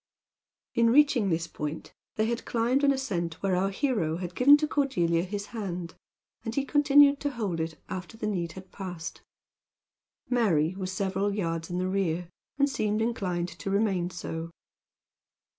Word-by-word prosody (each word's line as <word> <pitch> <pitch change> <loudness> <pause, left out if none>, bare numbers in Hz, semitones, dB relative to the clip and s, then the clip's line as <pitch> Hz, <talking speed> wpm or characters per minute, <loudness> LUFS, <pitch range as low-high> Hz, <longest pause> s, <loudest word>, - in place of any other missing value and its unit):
In 230 0 +4
reaching 255 -5 +4
this 165 -1 0
point, 150 -1 -6 0.2
they 215 - +1
had 235 +1 -2
climbed 245 +4 +1
an 280 - +6
ascent 185 -12 -2
where 190 -2 +2
our 190 +2 +1
hero 195 - 0
had 180 -1 -5
given 280 +7 +7
to 305 +1 -1
Cordelia 180 - +1
his 200 +3 -4
hand; 180 -6 -4 0.5
and 225 0 -4
he 275 - 0
continued 290 -1 +5
to 290 - -1
hold 210 -10 -3
it 160 0 -4
after 185 +4 -6
the 220 - -4
need 175 -6 -2
had 190 +1 -11
passed. 180 -4 -6 1.1
Mary 185 -10 +2
was 185 -1 -4
several 195 +1 -1
yards 165 -4 -2
in 175 - -3
the 185 0 0
rear, 180 -3 -1 0.3
and 280 0 +4
seemed 215 -6 0
inclined 185 -7 -1
to 195 - -6
remain 195 -3 +1
so. 165 -2 -5
195 Hz, 160 wpm, -28 LUFS, 175-235 Hz, 1.1 s, given